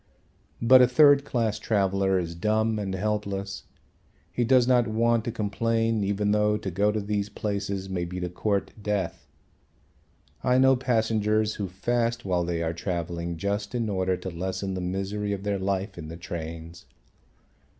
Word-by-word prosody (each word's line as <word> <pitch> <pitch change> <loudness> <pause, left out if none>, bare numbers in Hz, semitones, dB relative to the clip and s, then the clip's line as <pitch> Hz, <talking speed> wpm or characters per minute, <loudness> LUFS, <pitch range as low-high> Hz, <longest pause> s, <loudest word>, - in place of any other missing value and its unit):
But 130 +2 +8
a 125 - +7
third 145 +2 +6
class 115 -5 -1
traveller 95 -2 +1
is 85 -2 -2
dumb 110 +4 0
and 95 -2 -3
helpless. 100 -1 -3 0.7
He 120 - +1
does 125 0 +4
not 125 -2 +4
want 115 +1 +2
to 120 - -1
complain 115 0 0
even 100 +1 0
though 105 0 +2
to 100 -3 -5
go 100 +4 +2
to 110 - -1
these 105 0 -2
places 100 -2 -3
may 90 -2 -2
be 90 +1 -5
to 90 - -2
court 100 +3 -1
death. 100 -4 -2 1.2
I 125 0 +3
know 130 0 +6
passengers 110 -3 +1
who 100 - -1
fast 115 +6 -1
while 90 -2 +1
they 85 -1 -2
are 80 0 -1
travelling 85 -1 -3
just 100 +5 -2
in 115 -3 -1
order 95 -2 0
to 90 +1 -6
lessen 95 +3 -3
the 90 - -3
misery 100 +3 -2
of 100 -1 -5
their 100 -1 -1
life 95 0 -2
in 80 - -7
the 80 +2 -8
trains. 85 0 -7
100 Hz, 165 wpm, -26 LUFS, 95-110 Hz, 1.2 s, But